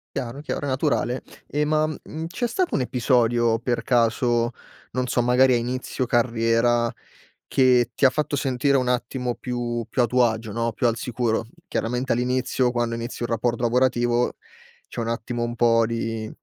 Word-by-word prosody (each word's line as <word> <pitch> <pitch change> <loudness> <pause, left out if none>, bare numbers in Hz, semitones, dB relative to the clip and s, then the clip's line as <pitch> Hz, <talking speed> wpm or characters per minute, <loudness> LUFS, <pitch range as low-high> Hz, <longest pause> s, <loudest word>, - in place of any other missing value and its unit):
Chiaro, 125 +4 -4
chiaro, 145 -1 -4
è - - -2
naturale. 130 -2 0 0.3
E 150 +1 0
ma, 155 +1 +2
uhm, 155 +1 -6
c'è 185 +8 -3
stato 355 +10 0
un 135 - +1
episodio 120 -2 +2
per 120 0 -1
caso, 120 0 +2 0.4
non 125 0 -1
so 120 - +1
magari 125 +1 +4
a - - +4
inizio 125 +2 -2
carriera, 120 0 +2 0.6
che 125 -2 +3
ti - - +1
ha 130 - +7
fatto 150 +2 -2
sentire 135 +1 +1
un 130 -2 0
attimo 125 -1 -1
più 120 -2 -3
più 125 - +1
a 120 - +3
tuo 125 +2 +3
agio 110 -1 -1
no, 115 +2 -1
più 120 - +1
al 115 - 0
sicuro? 115 -2 -1 0.2
Chiaramente 125 +3 -2
all'inizio, 125 +1 +1
quando 120 -1 -1
inizi 120 +1 -6
un 120 - -1
rapporto 120 +1 -1
lavorativo 120 0 +2 0.5
c'è - - -10
un 115 - -2
attimo 120 +1 -2
un 120 0 -3
po' 115 -1 +3
di 115 -1 -3
120 Hz, 175 wpm, -24 LUFS, 115-130 Hz, 0.6 s, ha